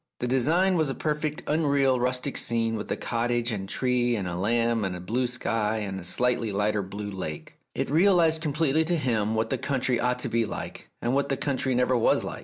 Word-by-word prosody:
The 125 - -2
design 165 +9 +3
was 155 -3 +1
a 135 - -2
perfectly 150 0 -2
unreal 140 -4 +2
rustic 125 +2 -1
scene 115 -1 0
with 105 - -5
a - - 0
cottage 120 0 -1
and 100 -3 -3
a - - -9
tree 125 -2 +1
and 100 -4 -3
a 90 - -4
lamb 115 +4 +1
and 95 -2 -2
a - - -6
blue 120 +8 -1
sky 115 -3 -1
and 100 -3 -4
a - - -9
slightly 115 +4 0
lighter 105 +1 0
blue 100 +2 -6
lake. 85 -6 -7 0.2
It - - -2
realized 165 -1 +4
completely 155 0 +1
to 175 +1 +1
him 110 -6 0
what 110 +4 -1
the 130 - 0
country 130 -2 0
ought 125 0 +1
to - - 0
be 115 0 +1
like, 105 - -7
and 120 +1 0
what 140 +1 +1
the 135 - 0
country 135 -2 -1
never 125 +1 +2
was 115 - +3
like. - - -6
125 Hz, 220 wpm, -26 LUFS, 110-140 Hz, 0.2 s, realized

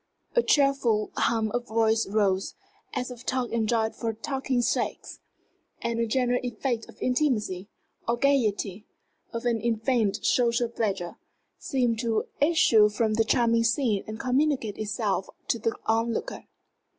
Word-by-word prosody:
A 485 - +5
cheerful 275 - +2
hum 220 -2 +1
of 245 +2 -2
voices 220 -2 +1
rose, 195 -3 +1 0.4
as 250 0 -2
of 245 -1 -10
talk 255 -2 -1
enjoyed 225 -1 0
for 230 -1 -2
talking's 260 +1 -1
sake; - - -1 0.7
and 235 0 -2
a 230 - +1
general 245 +1 +1
effect 240 -1 -3
of - - -15
intimacy, 215 -8 0 0.4
or 235 +1 +1
gayety, 220 -7 +1 0.4
of 230 0 -5
an 230 -2 +1
unfeigned 225 -2 0
social 235 -1 +2
pleasure, 200 -7 -2 0.4
seemed 245 -4 0
to 225 -2 0 0.2
issue 245 -9 +5
from 215 +1 0
the 225 +1 +3
charming 230 0 +2
scene 230 -3 +1
and 215 +1 -6
communicate 255 -4 0
itself 210 -2 -1 0.2
to 235 - +1
the 225 +1 -1
onlooker. 230 - -1
230 Hz, 140 wpm, -27 LUFS, 220-250 Hz, 0.7 s, A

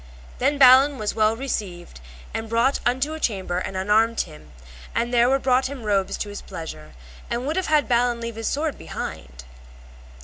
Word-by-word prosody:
Then 285 +3 +1
Balin 270 +1 +7
was 210 -3 -2
well 215 0 +2
received 190 - -5 0.3
and 225 0 -4
brought 235 +4 +2
unto 260 +5 0
a 315 - -6
chamber 190 - -1
and 190 +1 -5
unarmed 220 +4 +2
him; 75 0 -11 0.4
and 235 +1 -1
there 240 0 +4
were 270 - +3
brought 260 -1 +2
him 270 -3 -8
robes 200 -3 0
to 205 - -4
his 205 - -7
pleasure, 75 - -9 0.4
and 240 +2 -2
would 305 +3 -1
have 375 - -1
had 305 -2 +2
Balin 240 -1 +2
leave 230 0 -5
his 225 - -3
sword 300 +1 -2
behind - - -6 0.2
him. - - -20
235 Hz, 190 wpm, -23 LUFS, 205-265 Hz, 0.4 s, Balin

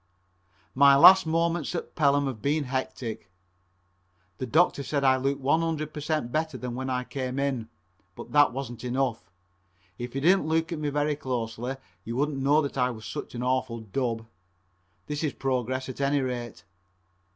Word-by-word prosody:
My 140 +1 +7
last 185 +5 +8
moments 165 0 0
at - - -5
Pelham 145 -1 +3
have 130 -6 -4
been 150 +4 +1
hectic. 125 -6 -4 1.1
The 130 - -3
doctor 155 +3 +3
said 140 +1 -1
I 130 -1 +5
looked 135 +1 -1
one 145 +5 +2
hundred 155 -2 -2
per 150 - -5
cent 150 -5 -2
better 155 -2 -1
than 125 -1 -5
when 130 +2 -4
I 125 -1 -1
came 130 0 -4
in, 135 -5 -1 0.5
but - - -10
that 145 -2 +5
wasn't 125 -2 -6
enough. 125 -6 -2 0.7
If 120 +1 -6
you 135 - -1
didn't 180 +1 +4
look 160 +1 0
at 165 - -3
me 150 -1 -1
very 145 +1 0
closely 125 -2 -3 0.3
you 115 +4 -5
wouldn't 145 +1 0
know 145 +3 +3
that 140 -1 -4
I 125 0 +3
was 110 -3 -8
such - - -6
an 120 - -3
awful 125 -2 -1
dub. 115 +1 -2 0.8
This 150 +1 -4
is 150 - 0
progress 130 0 -2
at 130 +1 -6
any 140 +1 +2
rate. 120 -4 -4
135 Hz, 175 wpm, -27 LUFS, 125-150 Hz, 1.1 s, last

